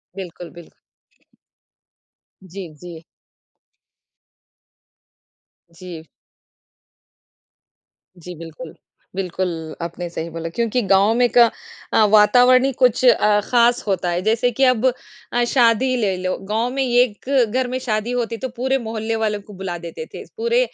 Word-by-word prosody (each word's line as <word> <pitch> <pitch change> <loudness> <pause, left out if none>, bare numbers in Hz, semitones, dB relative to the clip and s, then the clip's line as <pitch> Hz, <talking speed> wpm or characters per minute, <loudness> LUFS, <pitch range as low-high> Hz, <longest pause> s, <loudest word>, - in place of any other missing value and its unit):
बिल्कुल, 180 -2 -8
बिल्कुल। 170 -1 -14 1.7
जी, 190 0 -8
जी। 165 +1 -11 2.7
जी। 170 -2 -10 2.1
जी, 175 +1 -10
बिल्कुल। 165 0 -10 0.4
बिल्कुल, 185 -1 -2 0.3
आपने 170 +1 -5
सही 170 0 -5
बोला 165 0 -6
क्योंकि 235 +1 0
गाँव 195 +3 +4
में 245 0 +3
का 240 - +9 0.5
अ, 220 - +5
वातावरण 245 +4 +6
ही 275 - +1
कुछ 250 -1 +3
अ, 210 -3 +4
खास 240 0 +3
होता 185 -3 0
है, 175 +1 -1
जैसे 225 +4 +1
कि 270 +4 -1
अब 255 -2 +3 0.5
अ, 240 - +2
शादी 245 +1 +3
ले 205 -5 0
लो, 185 0 -1
गाँव 225 +3 0
में 270 +1 -2
एक 245 -2 +1 0.2
घर 255 0 0
में 255 +1 -3
शादी 220 -2 -2
होती 235 -2 -2
तो 260 +2 -5
पूरे 265 +2 +1
मोहल्ले 225 -2 -3
वालों 215 -2 -1
को 205 +1 -14
बुला 185 -2 -5
देते 170 - -8
थे, - - -7
पूरे 470 +2 +1
215 Hz, 135 wpm, -20 LUFS, 180-245 Hz, 2.7 s, का